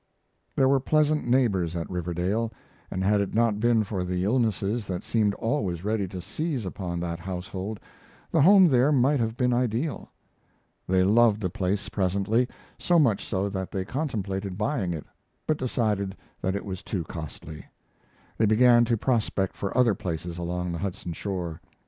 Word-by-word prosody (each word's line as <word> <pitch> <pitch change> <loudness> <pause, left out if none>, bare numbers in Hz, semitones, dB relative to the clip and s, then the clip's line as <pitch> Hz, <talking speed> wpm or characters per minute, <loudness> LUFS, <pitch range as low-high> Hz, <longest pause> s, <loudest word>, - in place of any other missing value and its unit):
There 135 - +4
were 135 0 +4
pleasant 150 +1 +2
neighbors 100 -10 +2
at 85 -1 -3
Riverdale, 90 +6 -1 0.4
and 95 - -2
had 100 +1 +3
it 100 - -3
not 115 -2 +2
been 115 -1 +3
for 95 -3 -3
the 90 0 -2
illnesses 110 -1 0
that 90 -2 -3
seemed 105 -3 +1
always 105 - -2
ready 105 -1 0
to 90 0 -7
seize 140 - -3
upon 90 -2 -4
that 85 -1 -3
household 95 +3 -5 0.5
the 165 - +3
home 190 +3 +8
there 130 +2 +4
might 140 +1 +3
have 115 0 -1
been 125 -1 +2
ideal. 125 +4 -1 0.8
They 95 0 +3
loved 110 +2 +4
the 90 -4 -2
place 100 +2 -1
presently, 100 +5 +1 0.3
so 175 - +3
much 120 -11 +3
so 95 +1 -1
that 95 -2 -4
they 95 -2 -3
contemplated 100 -8 -3
buying 105 -5 -1
it, 80 -3 -5 0.4
but 155 - +1
decided 105 -6 -1 0.2
that 95 +1 0
it 100 - -4
was 95 -1 -5
too 95 -3 -3
costly. 80 -1 -8 0.7
They 110 - +4
began 120 +2 +6
to 115 -1 +1
prospect 110 -5 0
for 100 +4 -3
other 120 -4 +5
places 85 -1 -5
along 90 +1 -2
the 85 - -4
Hudson 90 -2 -4
shore. 85 -3 -4
100 Hz, 165 wpm, -26 LUFS, 90-120 Hz, 0.8 s, home